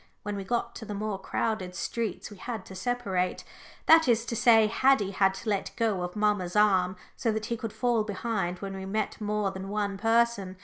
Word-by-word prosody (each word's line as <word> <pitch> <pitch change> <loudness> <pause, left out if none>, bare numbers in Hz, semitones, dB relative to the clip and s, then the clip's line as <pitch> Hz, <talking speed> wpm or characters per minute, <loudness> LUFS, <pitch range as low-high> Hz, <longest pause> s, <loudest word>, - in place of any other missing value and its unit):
When 205 -1 -3
we 200 - -4
got 235 +5 -1
to - - -8
the 210 - -5
more 205 -1 -3
crowded 190 -2 -2
streets 225 +2 -3
we 205 - -11
had 220 0 -5
to - - -10
separate 190 -3 -1 0.4
that 320 -2 +7
is 230 -1 +3
to 230 - -3
say, 225 -1 +6
Haddie 220 -2 +3
had 195 0 +2
to 220 - -5
let 200 -2 0
go 220 -6 0
of 180 +2 -4
mamma's 205 -4 0
arm, 190 -3 +4 0.2
so 230 - 0
that 215 0 -2
he 235 - -2
could 225 -2 -5
fall 240 -2 +1
behind 205 -3 -2
when 195 -1 -4
we 190 0 -6
met 215 +2 -2
more 210 -1 0
than 190 0 -7
one 200 -1 -2
person. 225 -4 +1
210 Hz, 210 wpm, -28 LUFS, 190-230 Hz, 0.4 s, that